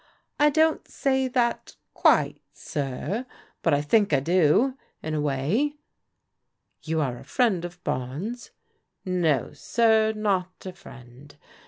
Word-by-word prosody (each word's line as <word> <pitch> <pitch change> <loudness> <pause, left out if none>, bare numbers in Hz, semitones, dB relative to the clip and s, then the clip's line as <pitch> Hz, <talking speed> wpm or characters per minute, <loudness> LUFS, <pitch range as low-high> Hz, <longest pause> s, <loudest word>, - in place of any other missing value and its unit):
"I 295 +1 +6
don't 315 +1 +2
say 265 -1 0
that, 245 -2 -1 0.2
quite, - - +3
sir, 150 - -4 0.3
but - - +2
I 145 0 +2
think 205 +6 +3
I 140 - +5
do, 180 - +3 0.3
in 155 - -3
a 150 - 0
way." 150 - 0 0.5
" - - -53
You 160 0 -1
are 130 -4 -2
a - - -12
friend 220 -9 +1
of 175 0 -8
Barnes? 160 - -4 0.2
" - - -46
" - - -56
No, 175 -6 0
sir, 220 -2 +2
not 195 -4 -2
a 185 - -6
friend. 130 -4 -15
185 Hz, 145 wpm, -25 LUFS, 145-235 Hz, 0.5 s, I